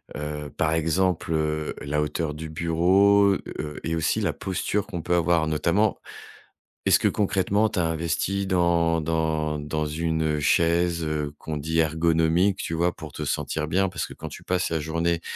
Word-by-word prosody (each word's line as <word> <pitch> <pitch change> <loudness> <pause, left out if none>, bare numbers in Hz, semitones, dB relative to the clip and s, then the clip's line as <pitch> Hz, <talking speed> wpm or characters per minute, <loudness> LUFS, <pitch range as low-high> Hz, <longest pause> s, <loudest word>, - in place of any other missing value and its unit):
Heu, 75 0 -5
par 80 - +1
exemple, 80 +2 +1
heu, 75 -1 -1
la 75 +1 -1
hauteur 75 +1 -2
du 80 +2 -6
bureau, 95 +5 +4 0.3
heu, 75 -1 -5
et 80 - -2
aussi 80 - 0
la - - +1
posture 95 +2 -2
qu'on 90 -3 -5
peut 90 +2 0
avoir 85 -2 +2
notamment. 85 +7 +1 0.9
Est-ce - - +5
que - - +2
concrètement, 100 +1 +1
tu - - -3
as 85 - +2
investi 85 +4 -1
dans 85 -3 +2
dans 80 -1 -1
dans 75 +1 -2
une, 80 +1 -1
heu, 75 -1 0
chaise, 85 +3 +2
heu, 75 -2 -2
qu'on 80 -1 -5
dit 80 +3 -2
ergonomique, 80 +4 +2
tu 80 - -3
vois, 85 +2 +1
pour 80 -4 -10
te 75 - -5
sentir 75 +1 -2
bien? 95 +5 +1
Parce 90 -1 -3
que - - -11
quand - - -8
tu - - -11
passes 90 0 0
la 80 - 0
journée 85 +2 -1
80 Hz, 180 wpm, -25 LUFS, 75-90 Hz, 0.9 s, Est-ce